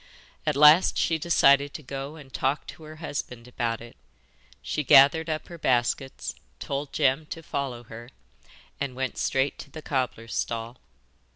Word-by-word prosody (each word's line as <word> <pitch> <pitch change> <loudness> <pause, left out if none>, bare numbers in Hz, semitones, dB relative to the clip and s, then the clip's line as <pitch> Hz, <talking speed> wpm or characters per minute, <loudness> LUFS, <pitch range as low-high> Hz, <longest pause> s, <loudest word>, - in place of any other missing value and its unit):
At 150 - +2
last 150 +5 +6
she 160 -1 +1
decided 140 -3 +4
to 155 - -7
go 135 +3 -6
and 140 -4 -14
talk 135 +3 -1
to - - -11
her 155 0 -10
husband 135 -6 -6
about 115 -2 -3
it. 120 0 -12 0.7
She 150 - -2
gathered 145 +5 +6
up 155 -1 -3
her 170 -1 -10
baskets, 130 +1 0 0.3
told 140 +1 -4
Jem 145 +1 +1
to 165 - -7
follow 135 -5 -4
her, 115 +1 -11 0.7
and 140 -3 -3
went 130 -1 -3
straight 135 +1 0
to - - -9
the 155 +2 -10
cobbler's 125 -4 -3
stall. 115 +1 -3
140 Hz, 160 wpm, -26 LUFS, 125-150 Hz, 0.7 s, last